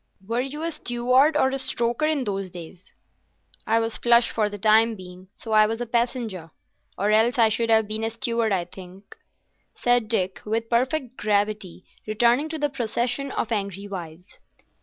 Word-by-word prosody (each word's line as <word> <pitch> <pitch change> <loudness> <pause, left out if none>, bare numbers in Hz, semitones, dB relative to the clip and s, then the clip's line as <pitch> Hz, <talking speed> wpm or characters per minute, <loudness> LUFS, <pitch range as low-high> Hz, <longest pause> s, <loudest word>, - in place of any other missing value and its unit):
"Were 235 +2 0
you 285 +4 -5
a 335 - -1
steward 255 +2 +2
or 265 - +3
a 270 0 -3
stoker 240 +3 0
in 305 -4 0
those 195 -3 -3
days?" 175 +1 -12 0.8
"I 225 +1 +3
was 225 0 -1
flush 235 0 +4
for 215 -2 0
the 205 - -7
time 220 +2 +4
being, 185 -1 -12
so 225 - -8
I 215 0 +6
was 225 +1 -3
a 240 - -2
passenger, 235 -7 -2 0.5
or 205 +2 +1
else 225 +3 +3
I 225 -2 +5
should 230 +1 0
have 220 -1 +4
been 215 +1 -3
a 225 - 0
steward, 230 -1 -1
I 180 -3 0
think," 185 +2 -13 0.6
said 245 -2 +2
Dick, 190 -5 -1
with 225 +2 -2
perfect 255 +1 0
gravity, 205 -3 -1 0.2
returning 240 +7 +2
to 320 - -4
the 295 -1 +1
procession 250 +1 -2
of 230 - -2
angry 200 -2 -3
wives. 180 -2 -9
225 Hz, 180 wpm, -24 LUFS, 205-245 Hz, 0.8 s, I